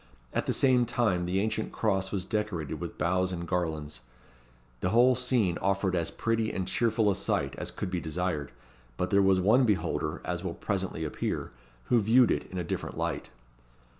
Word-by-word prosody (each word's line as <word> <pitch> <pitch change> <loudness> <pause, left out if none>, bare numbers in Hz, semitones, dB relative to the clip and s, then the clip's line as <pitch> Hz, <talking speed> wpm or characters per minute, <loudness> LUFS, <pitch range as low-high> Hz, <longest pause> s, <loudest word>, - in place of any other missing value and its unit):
At - - -1
the - - +2
same 125 -3 +3
time, 95 -8 +1
the 95 +2 +1
ancient 110 +1 -1
Cross 95 -3 0
was 95 -3 -2
decorated 105 -9 -2
with - - -6
boughs 90 +3 +1
and 85 -1 -4
garlands. 80 -6 -2 0.8
The 90 - 0
whole 120 +5 +5
scene 125 -8 +1
offered 95 -1 +1
as 85 -2 0
pretty 115 -1 -1
and 95 - -3
cheerful 110 -3 +2
a - - +2
sight 70 -5 -1
as - - -4
could 90 - -5
be 90 -2 -1
desired; 80 -3 -2 0.5
but - - -1
there 100 - +5
was 95 -1 +4
one 110 +8 +4
beholder, 85 -7 0
as 90 0 -3
will 85 -3 -3
presently 95 -5 -2
appear, 75 - -3 0.4
who 120 - +5
viewed 115 +3 +5
it - - -1
in 95 - -5
a 90 - -1
different - - -4
light. - - -2
95 Hz, 185 wpm, -29 LUFS, 85-110 Hz, 0.8 s, whole